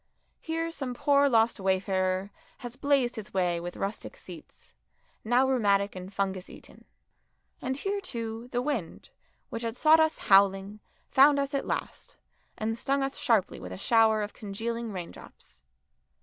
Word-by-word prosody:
Here 330 +1 -3
some 265 -6 -4
poor 280 +2 +3
lost 225 -2 +3
wayfarer 190 0 0 0.3
has 240 0 -6
blazed 270 -3 +1
his 210 -2 -8
way 175 -2 +1
with 175 +1 -7
rustic 205 - -5
seats, 475 - -13 0.5
now 245 +4 +3
rheumatic 200 -6 +2
and 185 +1 -8
fungus 195 -2 -3
eaten. - - -14 0.8
And 260 0 -2
here, 400 +6 -2
too, 230 - -5
the 245 0 -1
wind, 250 - -4 0.4
which 230 - -4
had 230 0 -4
sought 315 +3 +6
us 315 0 +2
howling, 195 +1 +3 0.3
found 280 +2 +6
us 280 0 -1
at 275 - -2
last, - - -5 0.4
and 220 +1 -2
stung 275 +3 0
us 270 0 -3
sharply 225 -6 +1
with 90 - -8
a 95 - -6
shower 220 - +3
of 205 - -6
congealing 225 +3 -4
raindrops. 175 - -10
225 Hz, 150 wpm, -28 LUFS, 195-270 Hz, 0.8 s, sought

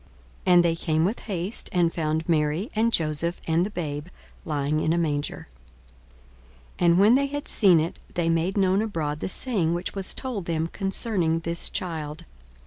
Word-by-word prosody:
42:002:016 180 - +6
And 175 0 +6
they 165 -1 +2
came 160 0 0
with 210 +6 -1
haste, 190 0 -4
and 175 -2 +2
found 160 -1 -1
Mary, 160 - +1
and 225 +2 +2
Joseph, 165 -1 +1
and 165 +1 +2
the 195 - -2
babe 150 -5 -4 0.4
lying 150 -1 0
in 155 +1 +1
a - - +1
manger. 145 -4 -2 1.3
42:002:017 - - +2
And 170 +1 +5
when 210 +4 +6
they 280 +2 +3
had 290 +1 -5
seen 185 -6 +5
it, 160 +2 -3 0.2
they 170 -1 0
made 165 +4 +1
known 190 0 +3
abroad 160 -9 -2
the - - -3
saying 185 -7 0
which 175 +1 -4
was 195 -1 -3
told 240 -9 -3
them 165 -1 -1
concerning 195 -4 0
this 170 +1 0
child. 155 -4 -4
170 Hz, 180 wpm, -25 LUFS, 160-195 Hz, 1.3 s, 42:002:016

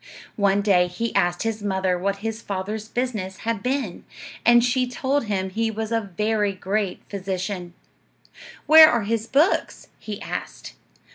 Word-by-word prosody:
One 200 -1 +2
day 180 -4 +4
he 225 +6 -4
asked 175 -3 +1
his 225 -1 -2
mother 190 -2 0
what 195 +3 -1
his 225 0 -3
father's 205 +2 -4
business 220 -6 -3
had 230 -3 -1
been, 250 -7 -2 0.4
and 240 0 +6
she 250 +1 +1
told 265 +2 -1
him 190 -3 -2
he 225 +3 0
was 220 0 -4
a 230 0 +1 0.2
very 210 -1 +1
great 195 0 -2
physician. 190 -2 -4 0.9
"Where 315 0 +9
are 235 -3 +1
his 225 +1 -2
books?" 290 - +1
he 210 -2 -7
asked. - - -6
210 Hz, 150 wpm, -23 LUFS, 190-230 Hz, 0.9 s, Where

